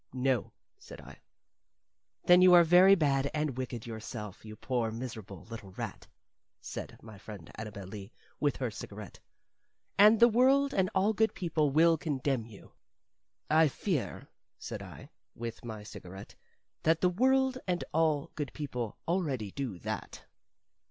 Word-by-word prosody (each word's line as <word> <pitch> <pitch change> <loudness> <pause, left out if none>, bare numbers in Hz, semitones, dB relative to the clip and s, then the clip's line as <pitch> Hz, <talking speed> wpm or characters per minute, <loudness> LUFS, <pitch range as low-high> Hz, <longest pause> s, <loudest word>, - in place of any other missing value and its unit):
"No," 130 -2 0 0.3
said - - -12
I. - - -13 1.0
"Then 180 +1 +6
you 180 -1 +8
are 175 - +8
very 180 +4 +7
bad 140 -5 +1
and 150 -4 -1
wicked 125 -3 -5
yourself, 110 -3 -7
you 110 -1 -9
poor, 120 0 -1
miserable, 110 -6 -7
little 110 -5 -10
rat," - - -6 0.5
said - - -7
my 110 -3 -12
friend 100 -6 -10
Annabel 105 -3 -7
Lee, 100 +1 -9 0.3
with 145 -1 +1
her 125 -4 -2
cigarette, 105 -2 -9 0.8
"and 210 +2 +7
the 235 - +8
world 265 +4 +3
and 185 -1 +2
all 200 +3 +3
good 220 +2 +1
people 160 -4 0
will 160 +3 +4
condemn 135 -6 -1
you." 105 -4 -14 0.8
"I 160 +1 +5
fear," 155 - -3 0.3
said - - -6
I, - - -11 0.2
with 115 0 -6
my 110 -3 -7
cigarette, 95 -2 -10 0.5
"that 160 +1 +2
the 180 - +4
world 260 +6 +2
and 180 -1 0
all 155 -2 +1
good 145 -4 -5
people 125 -7 -5
already 145 - -1
do 130 -8 -4
that." - - -6
135 Hz, 145 wpm, -31 LUFS, 110-175 Hz, 1.0 s, you